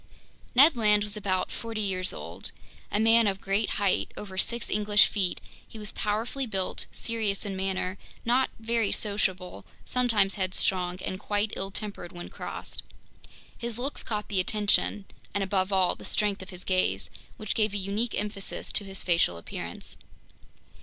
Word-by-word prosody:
Ned 285 +4 +8
Land 210 -3 +5
was 210 0 -1
about 185 -3 0
forty 225 -1 -4
years 185 -2 0
old. - - -5 0.4
A 205 - +2
man 225 0 +6
of 195 -1 0
great 200 +3 +1
height—over 200 0 -1
six 235 +4 -1
English 210 0 +5
feet—he 200 +2 -3
was 210 -1 -4
powerfully 225 +6 -1
built, 190 -4 -2
serious 220 -3 -1
in 195 -1 -3
manner, 190 0 -1 0.3
not 250 +3 +3
very 225 -2 +1
sociable, 185 - -1 0.2
sometimes 225 -6 +3
headstrong, 185 -1 0
and 185 - -3
quite 205 0 0
ill 195 - -1
tempered 200 -3 -5
when 175 0 -7
crossed. - - -6 0.7
His 235 -1 -2
looks 270 +4 -3
caught 210 -2 -3
the 195 - 0
attention, 210 0 +2 0.3
and 200 - +2
above 190 0 +1
all 190 -2 +4
the - - -11
strength 205 -2 +1
of 190 - -9
his 180 -1 -8
gaze, 145 - +1 0.3
which 215 -2 -2
gave 215 -2 +2
a - - +2
unique 205 +5 -1
emphasis 205 -1 -3
to - - +1
his 195 -1 -5
facial 170 - +3
appearance. 85 - -7
205 Hz, 155 wpm, -28 LUFS, 190-220 Hz, 0.7 s, Ned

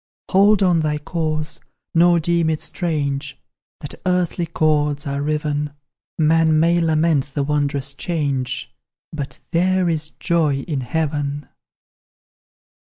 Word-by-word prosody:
Hold 200 +1 +5
on 175 -3 +3
thy 150 -1 0
course, 155 0 -3 0.3
nor 170 +1 +5
deem 170 0 +1
it 155 -1 0
strange 145 -5 -3 0.4
That 145 - -7
earthly 180 -1 0
cords 150 -2 +1
are 140 0 -2
riven: 150 -1 -1 0.4
Man 160 0 +4
may 170 +2 +3
lament 160 -3 +2
the 145 - +1
wondrous 140 -1 -1
change, 135 - -2 0.4
But 145 -3 -5
"there 185 +1 +2
is 155 -2 -1
joy 155 -5 0
in 145 -2 -3
heaven!" 145 0 -2
155 Hz, 115 wpm, -21 LUFS, 145-170 Hz, 0.4 s, Hold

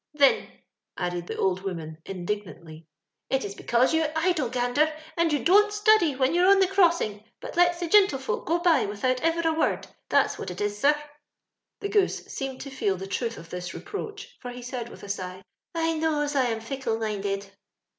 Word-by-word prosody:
" 295 - -21
Thin," 280 -2 +4 0.5
added 175 -1 -3
the - - -5
old 185 -1 +1
woman, 165 -5 -5
indignantly, 175 -4 -6 0.4
it's 260 -7 -1
because 240 +7 +2
you're 320 -1 +2
idle. 320 -6 +1
Gander, 250 +5 +1 0.2
and 335 -1 +2
you 290 - 0
don't 415 +4 +6
study 420 -8 +4
when 260 +3 +2
you're 355 +2 +4
on 395 0 +7
the 385 - +5
crossing; 340 - +2 0.2
but - - -8
lets 350 0 +4
the 345 - -2
gintlefolk 325 -9 +3
go 335 +3 +3
by 345 - +3
without 250 +5 -1
ever 330 0 +1
a 320 - +2
word. 320 - 0 0.2
That's - - +2
what - - -5
it 180 - -7
is, 205 0 -1
sir." 295 +5 +4 0.8
The 405 - -2
Goose 405 -3 +1
seemed 270 -1 -4
to 275 - -7
feel 200 -8 0
the 190 - -6
truth 230 +4 -3
of 170 0 -12
this 180 0 -5
reproach, 420 +3 -7
for 250 - -6
he 245 0 -8
said 245 -1 -5
with - - -13
a - - -8
sigh, 185 -1 -5 0.2
" - - -37
I 325 -1 0
knows 300 -2 0
I 270 -3 +3
am 225 -1 -2
fickle 230 -1 -2
minded." 200 -2 -3
265 Hz, 195 wpm, -26 LUFS, 200-335 Hz, 0.8 s, on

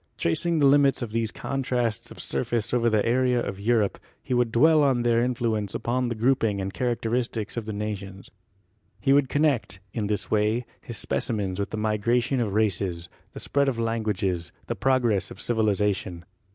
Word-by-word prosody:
Tracing 170 - +1
the 145 - +4
lim 140 0 +6
its 135 - -1
of 115 - -5
these 115 -1 0
contrasts 125 -5 -2
of - - -12
surface 110 - -2
over 120 -1 +3
the 110 -2 +2
area 125 +1 +2
of 100 -4 -4
Europe, 110 -1 +1 0.2
he - - -3
would 120 -2 +2
dwell 155 +6 +5
on 130 -4 +2
their 120 -1 +3
influence 115 -4 -1
upon 125 +1 -1
the 120 - -2
grouping 115 -3 +1
and 95 0 -3
characteristics 120 -2 -2
of 115 -2 -4
the - - -2
nations. 100 -2 -5 0.7
He 135 - +3
would 140 -2 +3
connect, 145 -10 +1
in 105 -3 -2
this 105 -2 -2
way, 110 +3 +1 0.2
his 120 - -7
specimens 100 -4 -2
with 100 - -2
the - - -4
migration 115 +5 +1
of 105 -4 -1
races, 95 -5 0 0.2
the - - -7
spread 140 -1 +1
of 125 - -3
languages, 105 -7 -1
the - - -3
progress 120 -8 +1
of - - -11
civilization. 105 -6 0
115 Hz, 180 wpm, -25 LUFS, 105-125 Hz, 0.7 s, lim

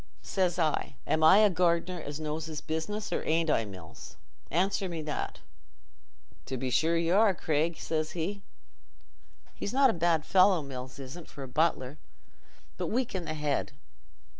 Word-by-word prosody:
Says 180 -3 0
I, 155 -4 0
'Am 155 - +1
I 160 +5 +8
a - - +5
gardener 175 0 +1
as 145 0 -6
knows 155 +1 -3
his 155 -2 -5
business, 205 +7 -3
or - - -1
arn't 165 0 +1
I, 115 - +2
Mills? 95 -5 -11 0.3
Answer 190 +3 0
me 165 -2 -4
that.' 150 -1 -4 1.1
'To 130 - -3
be 130 0 -2
sure 165 +6 +3
y' 165 0 +1
are, 200 0 +5
Craig,' 160 +1 0
says 155 -1 -2
he—he's 195 +3 -9
not 270 -1 +5
a - - -4
bad 165 -2 +1
fellow, 185 -3 +5
Mills 130 -2 -7
isn't, 140 +5 -8
for 140 - -8
a - - -6
butler, 145 0 0 0.8
but - - -2
weak 245 -2 -1
i' - - 0
the 155 -3 -4
head. 150 -3 -1
160 Hz, 165 wpm, -29 LUFS, 150-180 Hz, 1.1 s, I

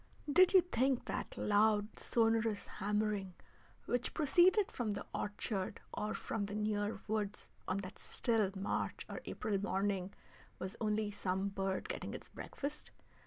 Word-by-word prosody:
Did 370 +3 +7
you 375 - +9
think 265 -6 +1
that - - -4
loud, 210 0 +3
sonorous 225 -2 +2
hammering 205 -2 -1 0.5
which 245 0 -1
proceeded 355 +7 +5
from 240 -3 -2
the 205 -1 -2
orchard 205 -2 -2
or 210 - -2
from 205 -2 -2
the 205 - -5
near 210 0 0
woods 210 -1 -2 0.2
on 185 - +1
that 185 - -9
still 225 -5 +1
March 195 +1 -2
or - - -6
April 210 -2 -1
morning 195 -2 0 0.5
was 185 +1 -5
only 210 -1 +1
some 190 0 -1
bird 195 - -2
getting 480 - -4
its - - -9
breakfast? 290 +2 -5
210 Hz, 140 wpm, -36 LUFS, 200-230 Hz, 0.5 s, you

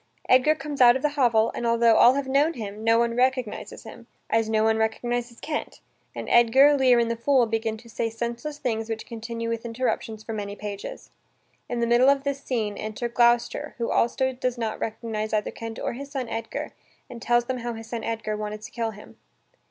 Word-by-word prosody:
Edgar 260 +5 +5
comes 290 -1 -5
out 240 0 +8
of 265 - -3
the 300 - +3
hovel, 235 -6 +2
and, - - -5
altho 235 0 +4
all 245 +3 +6
have 280 -1 -1
known 285 +5 +2
him, 215 -4 -7
no 225 0 +4
one 235 0 +1
recognizes 255 -2 -1
him, - - -12 0.2
as 225 -1 +2
no 220 0 +2
one 220 0 +3
recognizes 235 +2 -2
Kent, 300 -1 -4 0.4
and - - -6
Edgar, 265 +5 +6
Lear, 260 -3 +4
and 230 -1 +2
the - - -1
fool 255 +1 +3
begin 225 0 -2
to 235 +2 -16
say 230 0 -2
senseless 235 +6 -5
things 225 -4 -2
which 225 -1 -4
continue 230 0 -5
with 230 0 -3
interruptions 230 -2 -3
for 225 - -6
many 205 -1 -4
pages. 205 -1 -7 0.6
In 240 -1 -2
the - - +3
middle 240 +3 +5
of 275 -1 +2
this 280 -1 -2
scene, 220 -7 -2
enter 215 +3 -4
Gloucester, 240 +4 +1
who 235 -2 -2
also 260 +2 +1
does 250 -1 -2
not 225 -2 -3
recognize 220 -1 -4
either 210 -1 0
Kent 225 -1 -7
or - - -3
his 275 +3 -8
son 270 -4 -4
Edgar, 225 0 -5 0.3
and 240 -3 -10
tells 240 0 +2
them 255 0 -3
how 240 0 -4
his 225 0 -8
son 230 0 -5
Edgar 220 -2 -3
wanted 210 0 -5
to - - -9
kill 230 -2 -2
him. 210 -1 -13
235 Hz, 210 wpm, -25 LUFS, 225-255 Hz, 0.6 s, out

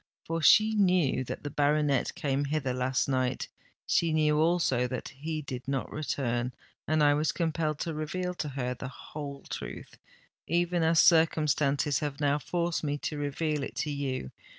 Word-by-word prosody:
For 165 0 -2
she 215 +7 +6
knew 180 -10 +2
that - - -6
the 145 - -4
baronet 145 -1 +1
came 145 -4 -1
hither 140 -3 -1
last 130 +1 0
night—she 130 +5 -1
knew 150 -1 +3
also 160 -7 +2
that 130 0 -5
he 155 +3 -5
did 130 -2 -6
not 135 -1 -2
return—and 135 +2 -2
I 145 0 +5
was 150 +2 +1
compelled 160 -3 -1
to 165 - -2
reveal 180 +4 -3
to 150 -4 -4
her 130 -2 -2
the 125 - -7
whole 140 +1 -8
truth, - - -7 0.5
even 175 +1 +1
as 160 0 +4
circumstances 150 -3 +3
have 145 -2 -4
now 145 0 +2
forced 170 +4 -2
me 145 -1 -1
to 150 +1 -4
reveal 150 +1 -1
it 135 - -5
to 150 - -3
you. 135 - -3
150 Hz, 160 wpm, -29 LUFS, 135-160 Hz, 0.5 s, she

